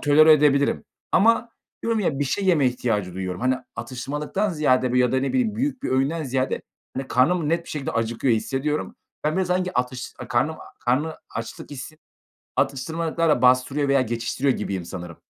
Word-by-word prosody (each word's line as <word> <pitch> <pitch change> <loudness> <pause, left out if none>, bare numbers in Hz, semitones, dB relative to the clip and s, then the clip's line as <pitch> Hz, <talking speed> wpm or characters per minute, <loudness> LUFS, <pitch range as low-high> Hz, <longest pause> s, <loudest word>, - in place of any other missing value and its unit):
tolere 155 +2 +7
edebilirim 140 -2 +3 0.3
ama 230 +4 +4 0.3
diyorum 230 -1 +1
ya, 155 -8 0
bir 145 - +1
şey 195 +9 -1
yeme 165 -8 +4
ihtiyacı 110 -7 -1
duyuyorum. 95 -1 -4
Hani, 130 +1 +2 0.2
atıştırmalıktan 150 +10 -2
ziyade 130 -6 +2
ya 125 0 +3
da 130 - +2
ne 135 - -1
bileyim 245 -5 +1
büyük 260 +1 -1
bir - - -2
öğünden 135 +5 +1
ziyade, 130 0 -1 0.3
hani, 135 0 -3
karnım 155 +6 +2
net 170 +1 +1
bir - - -14
şekilde 145 -3 -3
acıkıyor 115 +2 +1
hissediyorum. 135 +7 -2 0.3
Ben 155 +1 +1
biraz 190 -1 +1
sanki 180 -3 0
atış 125 +1 -3
karnım 150 +6 +1 0.3
karnı 145 +6 +1 0.2
açlık 115 +4 -6
hissi, 145 +3 -8 0.6
atıştırmalıklarla 160 +1 0
bastırıyor 130 +3 +3
veya 140 -1 +4
geçiştiriyor 120 +3 0
gibiyim 95 -4 -3
sanırım. 85 -2 -7
140 Hz, 165 wpm, -24 LUFS, 125-160 Hz, 0.6 s, tolere